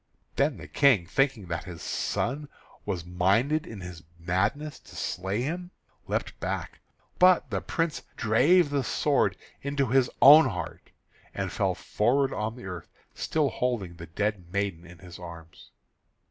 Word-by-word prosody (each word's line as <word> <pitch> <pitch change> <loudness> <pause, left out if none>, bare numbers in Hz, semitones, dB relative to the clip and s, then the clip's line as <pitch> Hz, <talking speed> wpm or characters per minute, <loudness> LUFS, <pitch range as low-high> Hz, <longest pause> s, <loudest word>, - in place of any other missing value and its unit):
Then - - +1
the - - -10
King, 130 -11 +4
thinking 135 +1 +1
that 85 0 -3
his 90 -3 -8
son 145 +5 -2 0.4
was 90 -5 -2
minded 100 - +1
in 105 -4 -8
his 90 -2 -8 0.2
madness 100 - -1
to - - -16
slay 95 +6 -2
him, 175 +5 -4 0.4
leapt - - -3
back, - - -4 0.4
but 180 0 +5
the - - -1
Prince 165 -2 -2 0.2
drave 145 +9 +4
the 140 -2 +1
sword 125 -13 +1 0.2
into 140 0 0
his 125 0 +3
own 145 +1 +9
heart, 90 -4 -6 0.5
and - - -2
fell - - 0
forward 135 +5 +1
on 110 +2 -3
the 125 - -10
earth, 90 -3 -7 0.3
still 155 -3 0
holding 110 -11 -2
the 85 0 -9
dead 95 0 -2
maiden 95 -4 -2
in 85 0 -13
his 90 0 -12
arms. 85 -2 -11
110 Hz, 150 wpm, -27 LUFS, 90-140 Hz, 0.5 s, own